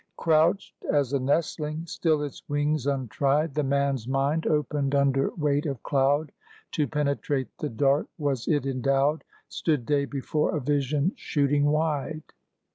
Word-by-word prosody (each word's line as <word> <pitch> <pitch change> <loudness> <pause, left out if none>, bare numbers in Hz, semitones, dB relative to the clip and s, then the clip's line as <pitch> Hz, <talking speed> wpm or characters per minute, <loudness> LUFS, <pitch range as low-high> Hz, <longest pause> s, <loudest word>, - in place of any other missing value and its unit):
Crouched 165 +4 +1
as 145 -2 +1
a 140 - +2
nestling, 155 +3 -1
still 160 -3 0
its 145 - -6
wings 145 -1 0
untried, 140 +3 0
The 150 - 0
man's 140 -3 0
mind 140 +4 0
opened 145 -2 0
under 135 -1 +2
weight 150 -1 0
of 135 -5 -4
cloud. 145 +2 +1 0.4
To 150 -2 0
penetrate 140 -1 -1
the 150 - -2
dark 140 +5 +2
was 140 -6 -2
it 145 -4 +1
endowed; 135 +3 +1 0.3
Stood 150 -7 -1
day 140 +2 +1
before 145 +3 -1
a - - -1
vision 145 +4 0
shooting 145 -1 +1
wide. 155 0 0
145 Hz, 140 wpm, -26 LUFS, 135-150 Hz, 0.4 s, a